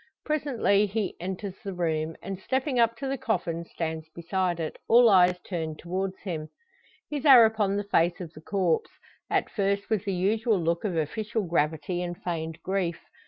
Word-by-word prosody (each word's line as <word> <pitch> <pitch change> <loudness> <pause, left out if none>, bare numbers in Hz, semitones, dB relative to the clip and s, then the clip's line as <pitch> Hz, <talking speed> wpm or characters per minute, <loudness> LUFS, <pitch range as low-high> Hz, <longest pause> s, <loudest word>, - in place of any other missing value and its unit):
Presently 265 -9 +2
he 205 -1 -2
enters 190 +2 -4
the 195 -2 -5
room, 160 -2 -1
and 195 -1 -5
stepping 260 +4 -1
up 230 0 +3
to 270 - -4
the 270 -1 -2
coffin 170 -5 -2
stands 160 -1 -5
beside 175 +1 -2
it, 160 -2 -4
all 240 +1 +7
eyes 180 -1 +5
turned 160 -4 -4
towards 185 +2 -3
him. 160 -6 -4 0.6
His 290 -2 -3
are 260 -6 +9
upon 210 -3 +1
the 205 - -1
face 175 -3 +2
of 170 -3 -7
the 155 - -12
corpse 180 -2 0 0.4
at - - 0
first 200 +1 -1
with 215 -4 +1
the 200 - 0
usual 215 +4 +1
look 170 0 0
of 190 -5 -1
official 215 +8 -1
gravity 165 0 0
and 175 -1 -4
feigned 160 -2 -4
grief. 185 -3 -1
185 Hz, 175 wpm, -27 LUFS, 170-215 Hz, 0.6 s, are